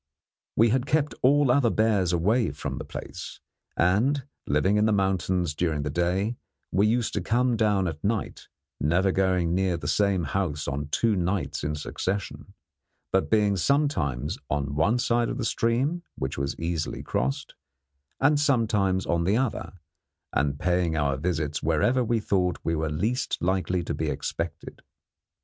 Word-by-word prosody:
We 115 +1 +5
had 130 +3 +1
kept 150 0 +1
all 140 0 +4
other 125 -2 +4
bears 105 -5 +2
away 105 +8 +2
from - - -5
the - - -4
place, - - -8 0.4
and, 115 +11 +2 0.2
living 85 +9 +2
in 105 +1 +3
the - - +2
mountains 95 -4 +1
during 75 -2 -1
the 75 - -2
day, 90 +8 0 0.3
we 100 +3 +3
used 115 +1 +1
to 100 - -1
come 120 +5 +1
down 105 -4 +2
at 80 -3 -6
night, 110 +1 -2 0.3
never 85 +6 +2
going 90 -3 +1
near 95 -1 +1
the - - -6
same 100 -4 +2
house 75 -2 -2
on 70 +1 -3
two 110 +8 +1
nights 90 +1 -1
in 75 +1 -1
succession, 95 +6 -4 0.6
but 95 - +1
being 105 -2 +3
sometimes 90 - 0
on 70 -1 -1
one 80 +11 +2
side 120 -1 +1
of - - -3
the 125 - -2
stream, 130 +11 0
which 65 +1 -3
was 70 0 -3
easily 80 -1 -3
crossed, 65 +2 -2 0.7
and 145 +2 +4
sometimes 110 -9 +2
on 85 0 +1
the 100 +5 +2
other, 130 -3 -2 0.6
and 70 0 +1
paying 90 -3 +1
our 70 -2 +1
visits 75 0 -2
wherever 100 - +2
we 115 0 +1
thought 90 -4 0
we 80 - 0
were 80 0 -1
least 105 - -1
likely 90 0 0
to - - -3
be - - -2
expected. 85 0 -5
95 Hz, 160 wpm, -26 LUFS, 80-115 Hz, 0.7 s, We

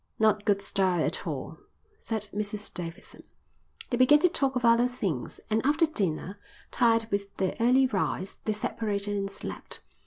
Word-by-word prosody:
"Not 215 -1 +2
good 200 -1 +2
style 185 -4 +2
at - - -3
all," - - -5 0.4
said 220 -2 -4
Mrs 210 0 -4
Davidson. 175 +3 -6 0.7
They 240 - +1
began 255 +4 +7
to 360 - +5
talk 275 -4 0
of 250 -1 0
other 235 +1 +5
things, 200 - -4
and 220 0 0
after 300 +5 +3
dinner, 195 - -2 0.3
tired 230 -2 +3
with 200 0 -3
their 190 -1 0
early 250 +3 +5
rise, 195 -4 -2
they 215 - +1
separated 205 -1 -2
and 195 -1 -2
slept. 195 - -6
210 Hz, 160 wpm, -28 LUFS, 195-240 Hz, 0.7 s, began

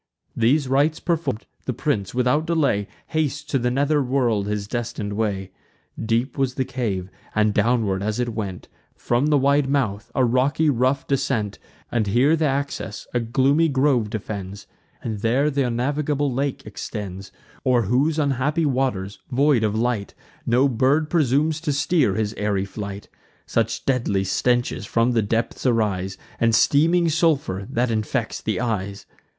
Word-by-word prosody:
These 130 +5 +2
rites 145 +4 +2
perform'd, 160 - -2 0.2
the - - -1
prince, 100 -2 -1
without 125 +6 +2
delay, 140 -12 +1 0.2
Hastes 150 -2 -1
to 140 -2 -1
the 125 0 +1
nether 145 +4 +2
world 120 -6 +1
his 105 -1 -2
destin'd 115 -3 -3
way. 100 -3 -2 0.5
Deep 115 +5 0
was 130 -2 0
the 130 - 0
cave; 105 -8 -3 0.2
and, 105 -1 +3
downward 105 -3 +1
as 105 +3 -2
it 120 -1 0
went 100 -5 -5 0.3
From 120 +4 0
the 150 -1 +4
wide 140 0 +3
mouth, 110 -8 -1
a 130 - +3
rocky 135 +6 +2
rough 130 +2 +1
descent; 130 -7 -1 0.3
And 115 -3 0
here 130 +10 +4
th' 165 - -5
access 140 -1 -2
a 120 - +2
gloomy 135 +7 +2
grove 130 -5 +2
defends, 100 -2 -6 0.4
And 110 -3 -3
there 130 +8 +2
th' 140 - -2
unnavigable 140 +3 0
lake 135 +1 -2
extends, 100 -2 -6 0.3
O'er 125 -2 +3
whose 135 +9 +1
unhappy 145 +2 +1
waters, 125 -8 -1
void 135 -2 +3
of 105 -1 +1
light, 115 -4 -1 0.3
No 125 +4 +4
bird 135 +5 +1
presumes 155 0 +2
to 165 -4 -1
steer 145 - +2
his 110 -1 -1
airy 100 -2 0
flight; 100 0 -7 0.4
Such 115 0 -1
deadly 120 -7 +1
stenches 120 +1 0
from 115 +1 +2
the 115 -2 +2
depths 115 +3 -2
arise, 100 -6 0 0.2
And 115 -1 +3
steaming 165 +8 +4
sulphur, 150 - +1
that 120 +1 0
infects 110 -3 -2
the - - -1
skies. 100 -4 -3
125 Hz, 155 wpm, -23 LUFS, 105-140 Hz, 0.5 s, the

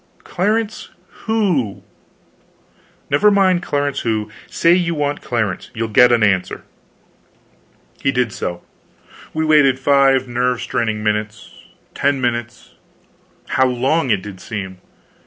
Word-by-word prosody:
"Clarence 215 +4 -2 0.4
who?" 185 - 0 1.3
"Never 210 - +4
mind 190 -3 +3
Clarence 145 -4 -1
who. 110 -2 -2 0.2
Say 170 +1 +3
you 175 -2 +1
want 145 -1 -2
Clarence; 110 -6 -2
you'll 115 0 -2
get 120 +3 +5
an 120 -2 +3
answer." 95 -3 0 1.4
He 135 - +1
did 125 -5 -1
so. 90 0 -5 0.7
We 160 0 -1
waited 150 -4 +4
five 135 -1 +3
nerve 125 0 0
straining 110 -2 -2
minutes 105 0 -3 0.4
ten 140 0 0
minutes 120 -1 -3 0.8
how 130 0 +3
long 130 +4 0
it 105 -4 +1
did 95 -3 -9
seem! 95 -4 -6
125 Hz, 120 wpm, -18 LUFS, 110-150 Hz, 1.4 s, get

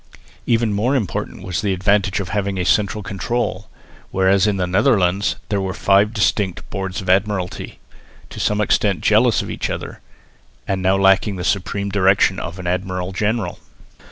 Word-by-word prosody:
Even 115 -2 +2
more 115 +7 +1
important 105 -5 -3
was 90 -3 -2
the 100 -2 0
advantage 100 +1 +1
of 95 - -4
having 100 -1 -2
a 90 - -1
central 105 +2 +1
control, 100 0 -3 0.4
whereas 95 +2 +3
in 105 -2 0
the 90 - 0
Netherlands 95 -1 +2
there 100 -2 0
were 95 0 -3
five 100 +2 +3
distinct 105 -4 0
Boards 95 0 -4
of 95 - -9
Admiralty, 95 -1 -1 0.5
to - - -8
some 105 0 +1
extent 100 -4 +1
jealous 110 +2 +3
of - - -6
each - - -3
other, - - -6 0.7
and 95 -1 -1
now 95 +1 +2
lacking 95 +1 +3
the 90 - -5
supreme 100 +2 -1
direction 95 -1 +3
of 85 +2 -6
an 90 - -8
admiral 90 +1 -2
general. 105 -1 -2
95 Hz, 165 wpm, -20 LUFS, 95-105 Hz, 0.7 s, whereas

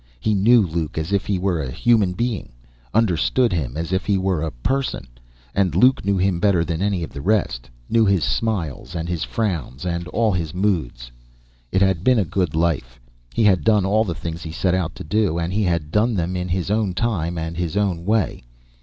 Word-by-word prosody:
He 105 - 0
knew 110 +4 +5
Luke 80 -2 -3
as 80 +5 -2
if 100 - 0
he 100 - +1
were 90 -3 0
a 65 - -4
human 105 - +2
being; 115 - -3 0.4
understood 115 +3 +2
him 70 -5 -2
as 85 +3 -3
if 95 - +1
he 100 -2 +3
were 95 -4 0
a 80 - -1
person. 130 - -2 0.5
And 95 -5 +1
Luke 130 +8 +4
knew 100 0 +1
Him 95 -1 +1
better 90 -4 +2
than 80 +1 -3
any 100 -3 0
of - - -6
the 70 - -7
rest; 95 - 0 0.2
knew 115 0 +3
His 100 -6 +2
smiles 85 - -2
and 85 0 -3
His 85 -2 -2
frowns, 85 - -3 0.3
all 110 -1 +2
His 85 -3 -3
moods. 80 -12 -1 0.6
It 95 - +3
had 95 -3 +1
been 130 +1 +4
a 105 - +2
good 90 -3 -1
life. 75 -7 -1 0.4
He - - +2
had 95 -7 +4
done 105 0 +3
all 105 +3 +3
the 90 -6 -3
things 85 +1 -6
He 80 - -6
set 90 +2 0
out 90 -3 -1
to - - -7
do, 100 0 +1
and 85 +1 -2
He 105 - +1
had 85 -5 -1
done 110 +4 +2
them 90 0 -1
in 90 0 -2
His 90 +2 -1
own 105 -4 0
time 90 -7 -1
and 80 +1 -4
His 85 +2 -2
own 95 -5 0
way. 105 - 0
90 Hz, 215 wpm, -21 LUFS, 80-105 Hz, 0.6 s, knew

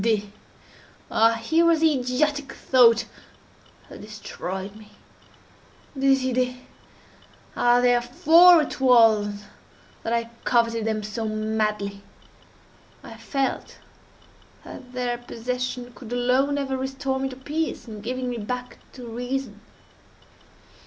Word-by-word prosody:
Des 225 +2 +2
idées!—ah 215 +2 -3
here 320 +9 +1
was 335 -2 +3
the 320 -1 +4
idiotic 275 +2 -1
thought 240 -3 +4 0.8
that - - -12
destroyed 200 -2 -7
me! 215 -1 -15 1.0
Des 270 0 +3
idées!—ah, 250 -1 -3
therefore 305 +8 +5
it - - -7
was 220 -5 +4 0.6
that 225 - -4
I 230 0 -1
coveted 230 -2 +1
them 215 -1 -1
so 215 +2 -4
madly! 215 -2 -2 1.0
I - - -10
felt 275 -2 -3 0.9
that 250 -1 -11
their 245 -1 -2
possession 245 +1 -5
could 240 -2 -12
alone 255 +4 +1
ever 270 -1 -2
restore 265 0 -3
me 270 0 -2
to 255 - -9
peace, 290 0 -4
in 215 -2 -8
giving 250 +3 -4
me 245 -1 -3
back 250 +4 -6
to 250 -2 -10
reason. 245 -1 -5
245 Hz, 110 wpm, -24 LUFS, 220-265 Hz, 1.0 s, therefore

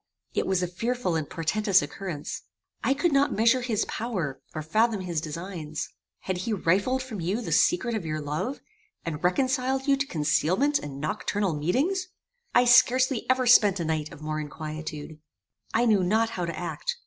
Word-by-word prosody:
It - - 0
was 190 -1 +1
a - - 0
fearful 230 +1 -2
and 155 -3 -2
portentous 190 +3 +2
occurrence. 150 0 -5 0.4
I 270 - +2
could 310 +4 +1
not 280 +1 +3
measure 230 +4 +4
his 235 -4 0
power, 185 - -3
or 155 - -3
fathom 215 +5 +2
his 170 -4 -2
designs. 160 -1 -5 0.3
Had 185 -1 -3
he 215 +5 -2
rifled 205 +8 +1
from 225 -8 -6
you 185 +7 -1
the 240 - -5
secret 255 -9 +3
of 220 -5 -2
your 155 -1 -3
love, 150 - -3 0.4
and 160 -1 -4
reconciled 260 +7 +1
you 280 - +5
to 275 0 -2
concealment 175 - +2
and 140 0 -7
noctural 195 +3 -1
meetings? 285 - 0 0.5
I 245 - +6
scarcely 255 0 +4
ever 255 0 +3
spent 205 -5 +6
a 170 - -1
night 155 0 -2
of 155 - -12
more 155 0 -2
inquietude. 155 0 -6 0.5
"I 235 +2 +2
knew 210 -5 +4
not 220 +5 +2
how 180 - -2
to 170 - -5
act. 475 - -3
190 Hz, 175 wpm, -27 LUFS, 160-245 Hz, 0.5 s, I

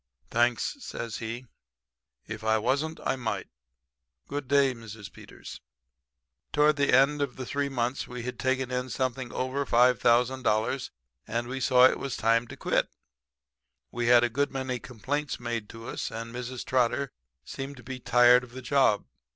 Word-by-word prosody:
"'Thanks,' 120 - +1
says 115 - -5
he. 115 +3 -5 0.8
'If 110 0 -7
I 110 0 +3
wasn't, 145 +8 -1
I - - +1
might. 120 -4 -3 0.8
Good 145 -1 -4
day, 140 -1 +4
Mrs. 110 -3 -10
Peters.' - - -11 0.9
"Toward 150 0 +4
the 140 0 +2
end 140 +3 +4
of 140 -3 -2
three 140 +2 -2
months 125 0 -2
we 125 -1 -6
had 125 +1 -5
taken 130 -1 0
in 125 0 -2
something 130 0 -2
over 130 +2 -1
$5,000, 125 0 +2 0.4
and 120 +1 -2
we 130 +2 -4
saw 125 -1 +6
it - - +4
was 135 -2 -4
time 115 +2 +2
to - - -10
quit. - - 0 1.0
We 120 0 -2
had 120 0 +7
a 120 - +2
good 140 +5 0
many 130 -2 -3
complaints 140 +6 -3
made 115 -3 -4
to 115 0 -10
us; - - -4
and 115 +1 -7
Mrs. 125 0 -5
Trotter 130 +2 +1 0.3
seemed 135 +1 -6
to 120 - -13
be 130 0 -6
tired 125 0 +5
of 120 -1 -13
the 130 0 -8
job. 135 -7 +3
125 Hz, 160 wpm, -28 LUFS, 120-135 Hz, 1.0 s, had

